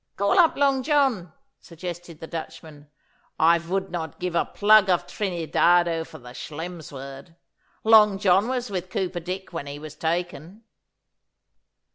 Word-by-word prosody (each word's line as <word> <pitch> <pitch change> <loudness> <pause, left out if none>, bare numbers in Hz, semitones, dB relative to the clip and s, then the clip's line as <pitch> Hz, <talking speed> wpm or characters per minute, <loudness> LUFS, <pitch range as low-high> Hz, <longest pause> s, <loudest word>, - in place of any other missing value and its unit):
'Call 200 - +2
up 335 -2 +4
Long 275 -2 +2
John,' 265 - +1 0.3
suggested 170 -1 -9
the - - -7
Dutchman. 160 -2 -9 0.5
'I 170 +2 +4
vould 190 +2 -3
not 160 -4 -5
give 180 -1 -3
a 170 - +1
plug 210 -1 +4
of 180 -2 +2
Trinidado 175 -2 +1
for - - -12
the 125 -1 -12
Schelm's 160 +5 -7
word. 135 +3 -10 0.5
Long 215 -3 +6
John 195 +2 +3
was 250 -3 -3
with 185 -1 -4
Cooper 185 -2 -2
Dick 185 +2 -6
when 155 -4 -5
he 140 0 -6
was 150 0 -9
taken. 175 +4 -4
175 Hz, 145 wpm, -24 LUFS, 160-195 Hz, 0.5 s, Long